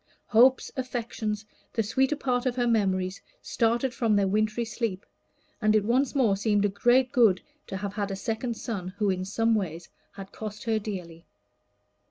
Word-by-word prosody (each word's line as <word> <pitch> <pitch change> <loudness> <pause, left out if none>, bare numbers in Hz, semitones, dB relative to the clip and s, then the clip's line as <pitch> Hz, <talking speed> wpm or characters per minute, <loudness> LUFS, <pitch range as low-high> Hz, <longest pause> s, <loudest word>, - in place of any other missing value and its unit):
Hopes, 250 +4 +4
affections, 230 -4 -3 0.3
the 225 - +1
sweeter 265 +7 +1
part 255 -3 -1
of 245 - 0
her 245 -1 +1
memories, 190 -5 +1 0.2
started 235 +3 0
from 230 -3 +1
their 200 -1 +3
wintry 215 +3 0
sleep, 220 -4 -3 0.6
and 215 0 +3
it 210 -2 +3
once 255 +5 +1
more 235 -8 +3
seemed 205 0 +1
a - - +2
great 245 +6 +3
good 225 -8 +4 0.3
to 190 - -4
have 200 0 -4
had 205 -1 -2
a 195 - -3
second 225 +3 -3
son 205 -7 -4
who 205 -2 +2
in 185 0 -2
some 225 +4 +1
ways 175 -5 -2 0.2
had 195 -1 -10
cost 215 -1 -7
her 225 -2 +1
dearly. 180 -6 -7
215 Hz, 175 wpm, -27 LUFS, 200-240 Hz, 0.6 s, Hopes